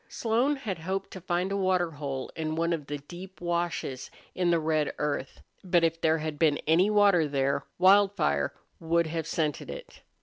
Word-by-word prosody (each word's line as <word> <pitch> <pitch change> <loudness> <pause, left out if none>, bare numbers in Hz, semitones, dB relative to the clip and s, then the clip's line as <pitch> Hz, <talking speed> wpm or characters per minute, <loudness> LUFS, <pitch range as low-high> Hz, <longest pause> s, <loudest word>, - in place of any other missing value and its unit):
Slone 240 +6 +1
had 215 - -5
hoped 190 +4 -3
to 185 - -8
find 180 +2 -1
a - - 0
water 185 -3 +1
hole 140 -3 -5
in 155 -1 -3
one 170 +1 +1
of 150 -4 -4
the 145 - -3
deep 175 +6 -11
washes 170 -6 -2 0.2
in 180 -1 0
the 170 - +4
red 155 -1 0
earth, 145 -2 -3 0.2
but 175 -2 +2
if 165 0 +1
there 160 0 +3
had 155 -1 -5
been 155 -3 +3
any 170 +6 +4
water 200 -6 +4
there 140 0 0
Wildfire 190 - +4 0.3
would 170 +1 +1
have 160 0 -3
scented 155 -4 -2
it. - - -9
170 Hz, 180 wpm, -28 LUFS, 155-185 Hz, 0.3 s, the